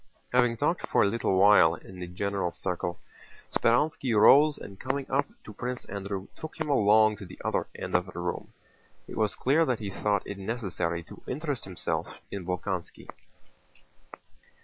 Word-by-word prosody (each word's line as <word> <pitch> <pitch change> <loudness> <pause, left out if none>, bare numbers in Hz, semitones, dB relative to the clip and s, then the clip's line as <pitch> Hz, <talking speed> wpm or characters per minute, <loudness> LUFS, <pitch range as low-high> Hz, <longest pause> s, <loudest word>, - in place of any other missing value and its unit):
Having 120 -2 +3
talked 150 +8 0
for - - +3
a - - +4
little 100 -2 0
while 95 -4 +6
in 95 +1 -12
the 90 - -5
general 95 +1 -2
circle, 90 0 -3 0.5
Speránski 120 -2 +2
rose 145 +6 +7
and 100 -1 -10
coming 135 +1 -2
up 140 +2 +2 0.2
to 110 - -10
Prince 125 +4 -4
Andrew 100 -1 -5
took 160 +1 -9
him 155 -1 -2
along 110 -3 +5
to 100 - -9
the - - -12
other - - 0
end - - -6
of 90 +1 +2
the 90 - -10
room. 90 0 -4 0.6
It - - -8
was 110 -2 0
clear 145 +6 +3
that 130 -7 +1
he 105 -3 -5
thought 100 0 0
it 100 0 -6
necessary 95 -6 -2
to - - -13
interest 145 -1 -3
himself 95 -3 -4
in 95 -3 -5
Bolkónski. 90 0 -4
105 Hz, 170 wpm, -28 LUFS, 95-125 Hz, 0.6 s, rose